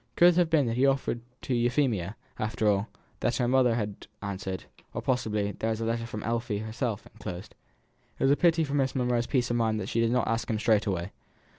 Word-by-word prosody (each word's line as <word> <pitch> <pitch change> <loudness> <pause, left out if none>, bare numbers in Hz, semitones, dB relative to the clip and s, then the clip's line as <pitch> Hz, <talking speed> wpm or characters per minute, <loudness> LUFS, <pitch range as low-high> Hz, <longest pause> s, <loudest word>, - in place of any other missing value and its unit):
Could 175 - +7
it 175 - +2
have 175 -2 +4
been 155 -4 +4
that 115 0 -1
he - - +1
had 135 - +6
offered 130 -3 -3 0.2
to 130 - -1
Euphemia, 120 - +1 0.2
after 110 0 0
all, 100 -1 +5
and 100 - -5 0.3
that 120 - +1
her 125 - +1
mother 125 -2 +4
had 105 -3 -4 0.2
answered; 95 -1 -4 0.3
or, - - -2
possibly, 105 -5 0
there 110 - -2
was 110 0 -1
a 115 - -2
letter 115 0 -1
from 110 -3 -6
Effie 115 -1 -1
herself, 110 +1 -3
enclosed. 100 -3 -8 0.6
It - - -2
was 135 - +5
a - - +6
pity 165 0 +3
for 140 -2 -3
Miss 135 -2 +1
Monro's 125 -2 +1
peace 125 -3 +1
of 120 - +1
mind 110 -2 +1
that - - -4
she 115 - 0
did 115 0 +3
not 125 0 +1
ask 115 0 -1
him 110 - +1
straight 110 -1 +2
away. 90 -1 -2
115 Hz, 240 wpm, -28 LUFS, 105-125 Hz, 0.6 s, Could